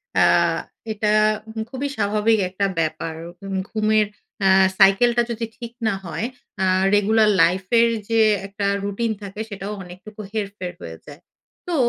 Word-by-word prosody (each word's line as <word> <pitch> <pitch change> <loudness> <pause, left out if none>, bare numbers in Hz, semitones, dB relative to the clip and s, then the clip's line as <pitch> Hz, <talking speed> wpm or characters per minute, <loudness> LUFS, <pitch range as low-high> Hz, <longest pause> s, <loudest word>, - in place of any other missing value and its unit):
অ্যা - - +4 0.3
এটা 210 0 0 0.4
হু 220 - -7
খুবই 270 +3 -3
স্বাভাবিক 210 +2 +2
একটা 195 +2 -1
ব্যাপার। 160 0 -2 0.3
উম 195 -1 -3
ঘুমের 215 0 +2 0.4
অ্যা 195 -1 +4 0.3
সাইকেলটা 235 +5 +5
যদি 230 0 -3
ঠিক 235 -1 -7 0.2
না 210 - +2
হয় 175 +6 -3 0.3
অ্যা 190 - +2 0.3
রেগুলার 215 +1 +4
লাইফের 190 +7 +3 0.2
যে 225 0 +3 0.3
একটা 200 0 -4 0.2
রুটিন 205 +3 -1
থাকে, 200 +1 -8
সেটাও 200 0 -5
অনেকটুকু 185 +4 -11
হেরফের 200 -4 -4
হয়ে 80 0 -8
যায়। 145 +3 -12 0.5
তো - - 0
205 Hz, 140 wpm, -22 LUFS, 190-220 Hz, 0.5 s, সাইকেলটা